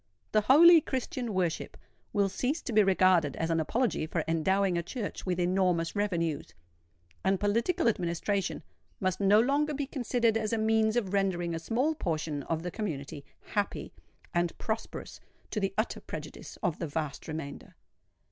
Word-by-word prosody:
The 215 - +4
holy 325 +8 +8
Christian 260 -3 -3
worship 180 -4 -2 0.3
will 200 -2 +2
cease 255 - -2
to 245 - -4
be 215 - +6
regarded 185 -6 +3
as 165 0 -1
an 165 - +2
apology 185 -1 0
for 165 0 -1
endowing 185 +3 +2
a 170 - +1
Church 205 +3 -5
with 180 -1 0
enormous 180 -1 +1
revenues; 170 - -1 0.7
and 190 0 +2
political 235 - +1
administration 190 -1 -1 0.4
must 185 -2 -1
no 200 +1 +5
longer 285 +5 +2
be 285 0 -2
considered 245 -4 +1
as 220 0 -2
a - - +2
means 220 0 +2
of 205 -6 -1
rendering 180 -4 0
a 165 - -2
small 245 - 0
portion 155 - -2
of 160 +3 -3
the 180 - -3
community 150 -9 -5 0.3
happy 205 -1 -2 0.4
and 175 -1 0
prosperous 220 0 -4 0.3
to 215 - -1
the 195 -1 0
utter 215 - -1
prejudice - - -8
of 160 - 0
the 170 - -2
vast 150 -1 -4
remainder. 155 -3 -7
195 Hz, 160 wpm, -30 LUFS, 170-225 Hz, 0.7 s, holy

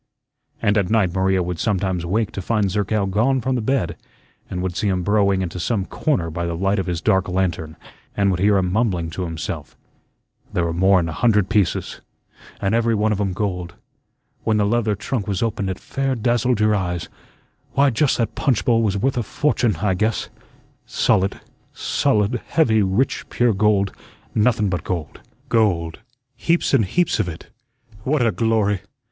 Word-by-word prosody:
And 105 +1 +3
at 90 -3 -1
night 105 -6 +2
Maria 95 -1 +2
would 90 -2 -4
sometimes 95 -4 -1
wake 105 +3 0
to 100 - -5
find 105 -1 0
Zerkow 105 0 0
gone 115 +8 +1
from 130 +2 -1
the 125 - 0
bed, 105 -9 -1 0.5
and 90 0 -3
would 90 -2 -3
see 105 - 0
him 90 -2 0
burrowing 100 -1 +2
into 90 0 -5
some 100 +1 -1
corner 90 - -1
by 85 +2 -3
the 85 - -2
light 95 +3 +1
of 95 - -3
his 85 -3 -2
dark 95 -3 +2
lantern 90 -4 -1 0.4
and 100 -1 +3
would 90 - -1
hear 100 +1 +4
him 90 -2 0
mumbling 95 -7 0
to 90 +2 -3
himself: 80 -2 -6 0.7
"There 90 - 0
were 85 - -1
more'n 95 0 +3
a - - -3
hundred 105 +1 +2
pieces, 105 -4 0 0.6
and 100 +1 0
every 115 0 +2
one 110 +1 +1
of 105 -1 0
'em 95 -2 -1
gold 90 -3 -3 0.7
when 110 -1 +2
the 105 - +2
leather 110 0 +1
trunk 105 +1 -3
was 100 -1 -1
opened 105 -4 -1
it 95 - -3
fair 135 -1 -2
dazzled 120 0 +1
your 105 0 +3
eyes 90 -5 -2 0.7
why, 140 0 +4
just 140 +4 +2
that 115 - -1
punchbowl 120 -4 +2
was 100 -3 +1
worth 130 +6 0
a - - +2
fortune, 120 -3 0
I 100 -3 +2
guess; 110 +3 -1 0.6
solid, 95 +1 +1 0.3
solid, 110 +3 0
heavy, 115 -10 +3
rich, 100 +7 0
pure 120 -2 +2
gold, 100 -1 +2 0.4
nothun 110 -1 +2
but 90 -3 -2
gold, 85 -5 -4 0.3
gold, 90 -8 +1 0.4
heaps 170 -2 +1
and 120 -6 +4
heaps 175 - +1
of 95 -4 0
it 80 - -10 0.5
what 135 -1 +1
a 115 - +3
glory! 110 -4 +1
100 Hz, 180 wpm, -21 LUFS, 90-115 Hz, 0.7 s, hear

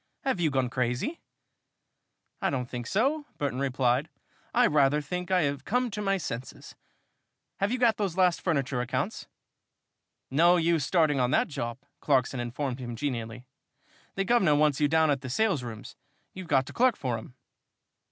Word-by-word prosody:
Have 265 -9 0
you 165 -3 +2
gone 130 -2 0
crazy?" 125 - -2 1.2
"I - - +1
don't 125 -3 -2
think 120 -1 -6
so," 285 +8 0
Burton 140 -3 -2
replied. 130 +1 +1 0.4
"I - - +4
rather 145 0 +3
think 180 +5 -5
I 185 -2 +3
have 140 -1 -2
come 250 +5 0
to 210 +1 -4
my 195 -1 +1
senses. 125 -7 -7 0.9
Have 200 +2 +1
you 250 - 0
got 235 -4 +3
those 195 -4 -2
last 180 -2 +3
furniture 140 -7 0
accounts?" 125 - -3 1.0
"No 170 +6 +5
use 165 -2 +2
starting 155 -3 +2
on 125 -1 +2
that - - +2
job," 120 -5 -4 0.2
Clarkson 130 -2 +1
informed 125 +2 -3
him, 120 -2 -5
genially. 120 -2 -4 0.7
"The 195 - -1
guvnor 190 -10 +4
wants 150 -2 +2
you 150 - +3
down 160 0 +3
at 140 -2 0
the 130 - -6
salesrooms, 125 - -2 0.4
you've 185 -2 -8
got 135 -3 +3
to - - -10
clerk 250 -1 +3
for 120 -4 -2
him." 125 +3 -13
145 Hz, 165 wpm, -28 LUFS, 125-185 Hz, 1.2 s, No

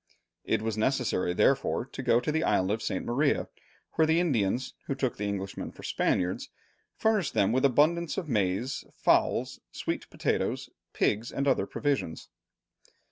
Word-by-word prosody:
It - - 0
was 110 -1 -2
necessary 125 -7 +1
therefore 135 0 +2
to 135 - -7
go 120 -2 +4
to 150 - -2
the 160 +1 0
island 95 +1 +2
of 110 +1 -1
St. - - -2
Maria, 140 +5 +1 0.4
where 160 - +2
the 160 +1 +3
Indians, 125 - 0
who 135 - -1
took 130 -3 -1
the 105 - -2
Englishmen 100 -1 -4
for - - -14
Spaniards, 90 0 0 0.5
furnished 210 -9 +1
them 100 - +3
with 130 +3 +2
abundance 155 +6 +3
of 185 -5 -3
maize, 105 +2 0
fowls, - - +2
sweet - - -4
potatoes, - - -1 0.2
pigs, 110 +3 0
and 140 +1 -1
other 135 - +2
provisions. 140 - -2
130 Hz, 155 wpm, -29 LUFS, 105-145 Hz, 0.5 s, go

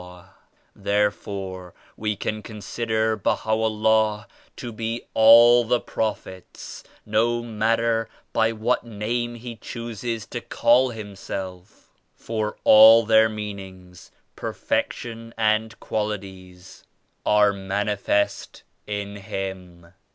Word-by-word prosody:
ei 90 0 -13 0.5
Therefore 100 -2 -2 0.2
we 105 -1 -2
can 105 +2 -4
consider 110 +1 -2
BahaVllah 110 +1 +1 0.3
to 120 - -7
be 115 +1 -4
all 115 +2 +7
the 120 +1 +1
Prophets, 95 -4 -5 0.2
no 115 +2 +1
matter 115 0 0 0.2
by 115 0 +2
what 115 +3 0
Name 120 +2 -3
He 120 0 -8
chooses 115 -1 -5
to 120 +1 -6
call 120 +3 +3
Himself; 100 -3 -8 0.2
for 110 -2 -4
all 110 +1 +8
their 110 0 +5
meanings, 95 -4 -9 0.3
perfection 115 -1 -4
and 110 0 0
qualities 95 -4 -6 0.4
are 105 -1 +4
manifest 100 +1 -2 0.2
in 100 -1 -4
Him. 95 -4 -7
110 Hz, 95 wpm, -23 LUFS, 100-115 Hz, 0.5 s, all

